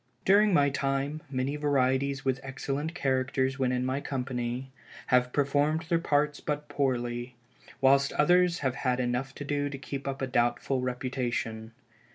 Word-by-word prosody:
] -, -, -39 dB
During 205 Hz, +2 st, +5 dB
my 145 Hz, -5 st, +4 dB
time, 140 Hz, +2 st, -1 dB
many 135 Hz, +2 st, -2 dB
varieties 135 Hz, -1 st, +1 dB
with 130 Hz, -1 st, +1 dB
excellent 140 Hz, +4 st, -4 dB
characters 130 Hz, -2 st, 0 dB
when 130 Hz, -1 st, +2 dB
in 125 Hz, 0 st, 0 dB
my 130 Hz, +2 st, -1 dB
company, 125 Hz, -1 st, -3 dB, 0.3 s
have 125 Hz, 0 st, +3 dB
performed 145 Hz, +3 st, +1 dB
their 165 Hz, +1 st, +1 dB
parts 150 Hz, -2 st, +1 dB
but 150 Hz, 0 st, -3 dB
poorly, 125 Hz, -3 st, -2 dB, 0.5 s
whilst 140 Hz, +1 st, +4 dB
others 175 Hz, +3 st, +4 dB
have 130 Hz, -, +2 dB
had 125 Hz, -1 st, 0 dB
enough 125 Hz, +2 st, -1 dB
to 145 Hz, -, -6 dB
do 145 Hz, 0 st, -1 dB
to 140 Hz, -, -6 dB
keep 135 Hz, 0 st, -6 dB
up 135 Hz, 0 st, -3 dB
a 135 Hz, -, 0 dB
doubtful 125 Hz, +1 st, 0 dB
reputation. 125 Hz, -3 st, -3 dB
135 Hz, 160 wpm, -29 LUFS, 125-145 Hz, 0.5 s, During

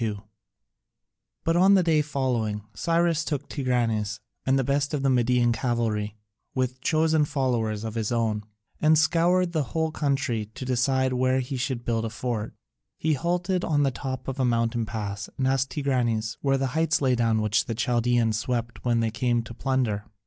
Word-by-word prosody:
[C.2] 105 Hz, -3 st, -2 dB, 1.2 s
But 165 Hz, -, +1 dB
on 190 Hz, +3 st, +6 dB
the 185 Hz, -, +4 dB
day 160 Hz, -3 st, +3 dB
following 125 Hz, -8 st, -1 dB
Cyrus 165 Hz, -, +1 dB
took 145 Hz, -3 st, -3 dB
Tigranes 115 Hz, -6 st, -1 dB, 0.3 s
and 135 Hz, +1 st, +4 dB
the 135 Hz, -, +2 dB
best 140 Hz, +3 st, 0 dB
of 140 Hz, -, -2 dB
the 135 Hz, -, +3 dB
Median 125 Hz, -1 st, +3 dB
cavalry, 115 Hz, -3 st, -1 dB, 0.4 s
with 130 Hz, 0 st, -1 dB
chosen 160 Hz, 0 st, +2 dB
followers 120 Hz, -7 st, -1 dB
of 110 Hz, -1 st, -4 dB
his 110 Hz, -1 st, -2 dB
own, 110 Hz, -3 st, 0 dB, 0.4 s
and 155 Hz, 0 st, +5 dB
scoured 170 Hz, +2 st, +3 dB
the 160 Hz, -3 st, +1 dB, 0.2 s
whole 160 Hz, 0 st, +1 dB
country 135 Hz, -8 st, -1 dB
to 130 Hz, -, -6 dB
decide 130 Hz, +1 st, +1 dB
where 130 Hz, +1 st, +2 dB
he 130 Hz, +1 st, -3 dB
should 125 Hz, -1 st, -3 dB
build 115 Hz, -1 st, 0 dB
a -, -, -2 dB
fort. 115 Hz, -1 st, -4 dB, 0.4 s
He 160 Hz, 0 st, +1 dB
halted 175 Hz, +4 st, 0 dB
on 145 Hz, -3 st, +2 dB
the 135 Hz, -, +2 dB
top 130 Hz, 0 st, -5 dB
of 135 Hz, 0 st, -4 dB
a -, -, +2 dB
mountain 115 Hz, -1 st, +1 dB
pass 105 Hz, -1 st, -4 dB
and 130 Hz, -, +1 dB
asked 135 Hz, 0 st, +1 dB
Tigranes 120 Hz, -6 st, 0 dB
where 135 Hz, -1 st, +2 dB
the 135 Hz, -1 st, -2 dB
heights 160 Hz, 0 st, +2 dB
lay 130 Hz, -3 st, +2 dB
down 115 Hz, -2 st, +2 dB
which 110 Hz, -1 st, +1 dB
the 115 Hz, -, -3 dB
Chaldaeans 120 Hz, -2 st, +1 dB
swept 120 Hz, 0 st, -3 dB
when 120 Hz, -2 st, +2 dB
they 115 Hz, -1 st, 0 dB
came 120 Hz, 0 st, 0 dB
to 115 Hz, -, -9 dB
plunder. 120 Hz, -5 st, -1 dB
125 Hz, 180 wpm, -26 LUFS, 115-145 Hz, 1.2 s, on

